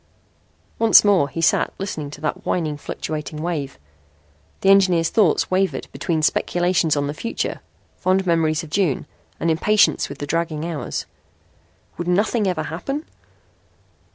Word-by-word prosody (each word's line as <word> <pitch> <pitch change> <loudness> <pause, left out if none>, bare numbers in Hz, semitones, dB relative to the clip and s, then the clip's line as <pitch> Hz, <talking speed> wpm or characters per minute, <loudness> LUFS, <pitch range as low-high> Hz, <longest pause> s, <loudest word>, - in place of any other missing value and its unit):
Once 225 -1 +7
more 190 -9 +4
he 165 - -4
sat 160 - +2
listening 160 -7 -4
to 145 - -10
that 155 - -3
whining, 155 -4 -1
fluctuating 150 +1 -5
wave. 155 -4 -3 0.8
The 195 - +3
engineer's 185 -4 +4
thoughts 205 -7 +2
wavered 190 +1 0
between 160 -4 -2
speculations 175 -1 +1
on 145 - 0
the 145 - -3
future, 230 +9 -4 0.4
fond 190 +1 +1
memories 160 -2 +1
of 155 - -11
June 180 -9 0 0.3
and 165 - +1
impatience 205 +6 +3
with 140 - -8
the 145 - -5
dragging 160 0 -2
hours. 165 -4 -4 0.9
Would 175 - -3
nothing 205 +4 +1
ever 175 -4 -1
happen? 275 - -4
170 Hz, 140 wpm, -21 LUFS, 155-190 Hz, 0.9 s, Once